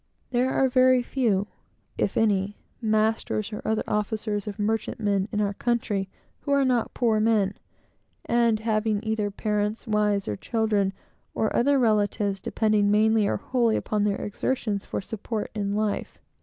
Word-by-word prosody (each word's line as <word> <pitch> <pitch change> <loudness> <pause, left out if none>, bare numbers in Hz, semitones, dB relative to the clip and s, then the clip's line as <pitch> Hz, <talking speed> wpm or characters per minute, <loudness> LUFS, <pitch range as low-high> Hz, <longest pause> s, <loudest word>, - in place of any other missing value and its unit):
There 250 +1 +2
are 265 - +3
very 255 0 +4
few, 225 -7 +1 0.5
if - - -1
any 205 -2 +1 0.2
masters 215 -1 0
or 210 - -5
other 220 0 0
officers 210 0 -2
of 205 - -5
merchantmen 210 -1 -1
in 210 - -1
our 205 -1 0
country, 210 -4 -1 0.3
who 285 - -4
are 280 -1 +3
not 245 -3 0
poor 225 -3 +2
men, 215 -3 +2 0.7
and 235 -2 +2
having 215 -1 0
either 220 -2 -1
parents, 210 +2 -2
wives, 210 -3 +1
children, 210 -4 0 0.4
or 220 - 0
other 280 +3 +3
relatives, 205 -4 +1
depending 215 -2 +1
mainly 215 0 +3
or - - 0
wholly 235 -4 +1
upon 210 -1 -1
their 205 -1 0
exertions 210 -1 -2
for - - -3
support 215 +1 -4
in 200 -1 -2
life. 210 -1 -2
215 Hz, 145 wpm, -26 LUFS, 205-225 Hz, 0.7 s, very